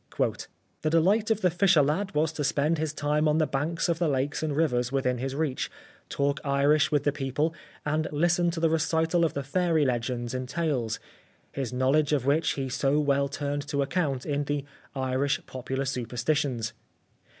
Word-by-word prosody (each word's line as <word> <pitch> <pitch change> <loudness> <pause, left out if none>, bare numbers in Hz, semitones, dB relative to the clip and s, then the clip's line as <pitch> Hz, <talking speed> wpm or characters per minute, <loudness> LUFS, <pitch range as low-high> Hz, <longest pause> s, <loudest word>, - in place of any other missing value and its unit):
" - - -36
The 155 - +1
delight 195 +8 +3
of 220 -1 +1
the 180 - +3
fisher 175 -4 +4
lad 160 +6 -1
was 155 +1 +2
to 150 - -3
spend 150 +2 +1
his 155 -1 -1
time 150 +1 0
on 150 0 +3
the 160 - +3
banks 150 +6 -1
of 170 -1 0
the 175 - +2
lakes 140 0 -1
and 155 -2 -1
rivers 125 -6 +1
within 125 -2 0
his 135 +1 -3
reach, 150 -3 -1 0.4
talk 140 0 0
Irish 140 +1 +3
with 145 -2 +2
the 145 - +2
people, 145 +4 -1 0.3
and 155 +1 0
listen 175 +3 +2
to 170 -1 -3
the 165 -1 +2
recital 160 +2 +2
of 165 - 0
the 140 - -2
fairy 165 +1 +1
legends 120 -1 -2
and 130 0 -4
tales; 135 -10 -1 0.5
his 135 -3 -3
knowledge 135 +4 +2
of 135 -4 +1
which 150 +3 +2
he 135 -1 -3
so 135 +3 +1
well 140 -1 +2
turned 145 +1 -3
to 140 -1 0
account 140 -4 -1
in 145 -1 -1
the 145 -1 -2 0.2
' - - -30
Irish 135 +2 0
Popular 130 +1 -4
Superstitions.' 125 0 -1
145 Hz, 190 wpm, -27 LUFS, 135-160 Hz, 0.5 s, fisher